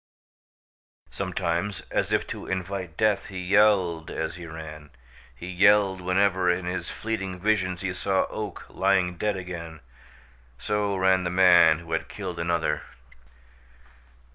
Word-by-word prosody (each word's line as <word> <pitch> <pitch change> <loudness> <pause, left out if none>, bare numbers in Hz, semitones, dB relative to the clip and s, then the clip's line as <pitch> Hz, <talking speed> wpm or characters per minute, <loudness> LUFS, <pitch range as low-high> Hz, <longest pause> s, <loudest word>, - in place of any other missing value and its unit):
Sometimes, 90 +1 -2
as - - 0
if - - +1
to - - -7
invite 95 -2 -4
death, 110 -2 +1
he 95 - -8
yelled 90 -3 +2
as 80 0 -3
he 85 0 -9
ran. 80 -2 -9 0.5
He 60 - -9
yelled 95 +1 +4
whenever 95 0 +2
in 90 0 0
his 90 +1 -3
fleeting 95 -5 -4
visions 95 -3 0
he 95 -1 -2
saw 95 0 0
Oak 105 -4 -6
lying 95 -2 +1
dead 105 +1 -1
again. 85 -3 -7 0.8
So 105 +5 -1
ran 95 0 +3
the 90 - -2
man 90 -3 +6
who 85 0 -11
had 80 - -2
killed 95 -4 -6
another. 85 -3 0
90 Hz, 135 wpm, -26 LUFS, 85-100 Hz, 0.8 s, man